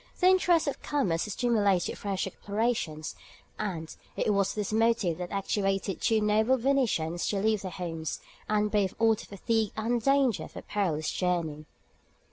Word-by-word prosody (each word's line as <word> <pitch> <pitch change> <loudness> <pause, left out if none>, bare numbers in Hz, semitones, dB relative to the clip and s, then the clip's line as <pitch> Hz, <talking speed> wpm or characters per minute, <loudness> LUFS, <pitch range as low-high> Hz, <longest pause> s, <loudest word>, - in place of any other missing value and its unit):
The 360 - +2
interests 355 -4 +4
of 285 - -3
commerce 215 - 0
stimulated 205 -5 +1
fresh 195 -2 -2
explorations, 200 -6 -2 0.5
and 170 -7 -4 0.2
it 210 - +2
was 200 -1 +1
this 210 -1 -2
motive 225 -6 +2
that 180 -1 -4
actuated 195 -1 -1
two 220 -1 +3
noble 220 +5 +3
Venetians 230 -11 +1
to 205 - 0
leave 215 +1 +1
their 190 - -4
homes, 165 -3 -4 0.3
and 210 0 +1
brave 205 -3 +1
all 225 0 +4
the 215 - -7
fatigue 220 +1 -1
and 230 +2 0
danger 275 -3 +2
of - - -13
a - - -7
perilous 165 -7 -1
journey. 165 -4 -1
205 Hz, 155 wpm, -29 LUFS, 180-230 Hz, 0.5 s, interests